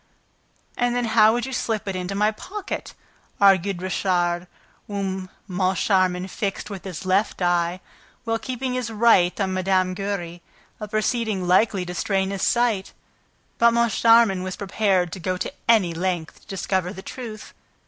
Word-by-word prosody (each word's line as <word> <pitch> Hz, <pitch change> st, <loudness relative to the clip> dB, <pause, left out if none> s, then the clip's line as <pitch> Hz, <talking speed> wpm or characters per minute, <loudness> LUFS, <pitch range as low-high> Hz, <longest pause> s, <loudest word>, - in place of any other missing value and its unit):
"And 245 Hz, 0 st, 0 dB
then 245 Hz, -1 st, 0 dB
how 220 Hz, -1 st, +5 dB
would 240 Hz, +1 st, -1 dB
you 265 Hz, -, -6 dB
slip 220 Hz, -4 st, -2 dB
it 195 Hz, -, -2 dB
into 185 Hz, +2 st, -3 dB
my 210 Hz, +2 st, +2 dB
pocket?" 390 Hz, -, -6 dB, 0.4 s
argued 195 Hz, -2 st, +3 dB
Richard, 180 Hz, -2 st, 0 dB, 0.4 s
whom 190 Hz, -2 st, -3 dB, 0.2 s
Moncharmin 185 Hz, -1 st, +1 dB
fixed 200 Hz, +1 st, -4 dB
with 195 Hz, -2 st, -7 dB
his 185 Hz, -1 st, -6 dB
left 190 Hz, +3 st, +1 dB
eye, 175 Hz, 0 st, +1 dB, 0.4 s
while 225 Hz, -1 st, -1 dB
keeping 255 Hz, +1 st, -3 dB
his 250 Hz, -3 st, -2 dB
right 220 Hz, -5 st, +3 dB
on 190 Hz, -2 st, 0 dB
Mme. 185 Hz, 0 st, +1 dB
Giry: 180 Hz, -3 st, -4 dB, 0.4 s
a 210 Hz, -, -5 dB
proceeding 215 Hz, -3 st, -1 dB
likely 190 Hz, 0 st, +3 dB
to 180 Hz, -, -5 dB
strain 190 Hz, +2 st, 0 dB
his 195 Hz, -, -4 dB
sight, 235 Hz, -5 st, +1 dB, 0.7 s
but 235 Hz, 0 st, +5 dB
Moncharmin 230 Hz, -3 st, +4 dB
was 185 Hz, 0 st, -4 dB
prepared 190 Hz, -3 st, 0 dB
to 190 Hz, -, -6 dB
go 185 Hz, +1 st, -2 dB
to 230 Hz, -, -4 dB, 0.2 s
any 200 Hz, -7 st, +4 dB
length 175 Hz, -1 st, -3 dB
to -, -, -25 dB
discover 185 Hz, -1 st, -1 dB
the 190 Hz, -1 st, -9 dB
truth. 225 Hz, -4 st, -8 dB
195 Hz, 155 wpm, -23 LUFS, 185-220 Hz, 0.7 s, how